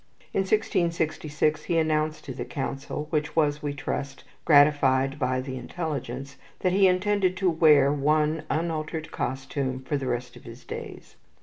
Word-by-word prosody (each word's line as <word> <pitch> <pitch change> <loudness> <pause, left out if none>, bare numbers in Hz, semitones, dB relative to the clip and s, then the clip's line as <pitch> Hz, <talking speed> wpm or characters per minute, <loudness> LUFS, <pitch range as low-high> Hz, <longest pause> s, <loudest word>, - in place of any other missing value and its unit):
In - - +1
1666 165 -6 0
he 170 - 0
announced 155 -1 0
to 135 - -5
his - - -6
Council 140 +1 -4
which 155 -1 -1
was, 150 -2 +2
we 145 -2 -2
trust, 140 0 -4 0.2
gratified 145 -2 +4
by 130 0 0
the 130 0 -6
intelligence 140 -4 -5 0.2
that 185 - +2
he 195 0 +5
intended 185 0 +1
to 190 -2 +2
wear 150 -4 +5
one 150 +2 +1
unaltered 160 0 -2
costume 130 0 -3
for 145 +2 -1
the 135 -2 -4
rest 125 0 -3
of - - -14
his 115 +2 -11
days. - - -8
150 Hz, 150 wpm, -26 LUFS, 135-160 Hz, 0.2 s, he